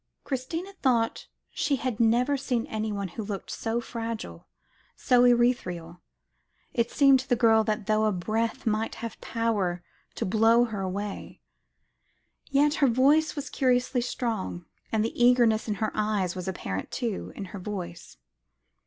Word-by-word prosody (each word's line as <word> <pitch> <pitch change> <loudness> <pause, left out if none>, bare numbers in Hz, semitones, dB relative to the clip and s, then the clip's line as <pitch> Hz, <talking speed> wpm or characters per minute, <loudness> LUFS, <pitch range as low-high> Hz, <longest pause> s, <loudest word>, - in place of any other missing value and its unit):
Christina 325 +9 -4
thought 235 -4 +1 0.2
she 285 -1 0
had 255 -4 -3
never 240 +5 +3
seen 250 -4 -1
anyone 210 -3 -3
who 215 +6 -6
looked 200 -1 -5
so 230 +1 -2
fragile, 225 - -6 0.5
so 245 -1 +4
ethereal; 180 -9 +1 0.7
it 235 0 +1
seemed 275 -2 +5
to 265 - -8
the 245 - +4
girl 225 -2 +4
as 215 -1 0
though 215 +1 +2
a 215 - +3
breath 220 +5 -2
might 220 0 0
have 230 0 -7
power 205 -7 -1 0.3
to - - -2
blow 225 +4 +4
her 215 -4 -4
away. 195 +2 -5 1.1
Yet 290 +1 +3
her 280 - +6
voice 280 +7 +3
was 285 -1 -5
curiously 250 -1 +1
strong, 220 -8 -3 0.3
and 220 -1 +1
the 240 - -1
eagerness 240 -3 +4
in 210 - -1
her 215 +1 -1
eyes 210 -4 0
was 180 0 -5
apparent, 95 - -4
too, 230 -6 -3
in 200 - -5
her 200 - -5
voice. 175 - -7
225 Hz, 150 wpm, -27 LUFS, 205-245 Hz, 1.1 s, her